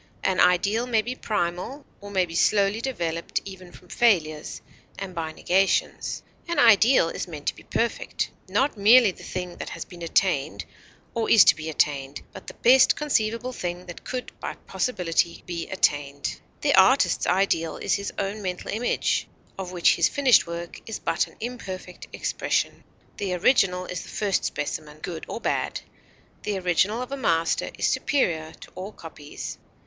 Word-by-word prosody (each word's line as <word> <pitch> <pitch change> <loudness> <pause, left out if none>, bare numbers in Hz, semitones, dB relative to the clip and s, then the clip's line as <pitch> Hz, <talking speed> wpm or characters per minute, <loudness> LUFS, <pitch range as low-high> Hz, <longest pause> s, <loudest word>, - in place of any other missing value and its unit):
An 190 - +1
ideal 200 +7 +3
may 225 -3 +2
be 245 - -3
primal, 210 +5 -3
or 205 - -10
may 190 -2 +2
be 165 - -10
slowly 200 +4 +2
developed 170 -10 -2
even 185 -2 -10
from 180 0 -17
failures 160 -10 +1 0.4
and 190 -1 -6
by 165 -2 -3
negations; 190 +4 0 0.2
an 340 - -2
ideal 225 -4 +6
is - - -4
meant 150 -4 -8
to - - 0
be - - -14
perfect, 235 0 -2 0.2
not 275 0 +1
merely 220 +1 +6
the - - -15
thing 180 -1 -5
that - - -6
has - - -6
been 175 -2 -13
attained 165 -3 0 0.5
or 230 -2 -1
is 220 - +9
to 135 - +6
be 160 +1 -6
attained, 140 -2 -1
but - - -11
the - - -8
best 255 +2 +6
conceivable 245 -4 0
thing 175 -3 -4
that 175 -2 -10
could 255 -1 -5
by - - -5
possibility 170 -7 -1
be 170 -2 -5
attained. 145 -6 0 0.2
The - - +2
artist's - - +4
ideal 175 -4 +1
is - - -1
his 200 0 -1
own 200 +2 -2
mental 180 -2 -4
image, 235 +3 0 0.3
of 185 -2 -6
which 175 -2 +3
his 170 - +4
finished 270 -9 +4
work 170 0 -6
is 225 - -4
but - - 0
an - - -18
imperfect 190 -7 -7
expression. - - -1 0.3
The 190 -3 -2
original 180 -2 +3
is 180 -2 -5
the - - -11
first 200 -3 0
specimen, 150 +1 -4
good 165 -3 -5
or - - -5
bad; - - -1 0.6
the 205 -2 -2
original 185 +6 +1
of 255 - -10
a 275 - -3
master 165 -10 +1
is - - 0
superior 160 - 0
to - - -12
all 190 +3 -7
copies. 150 -3 -8
185 Hz, 170 wpm, -25 LUFS, 170-220 Hz, 0.6 s, is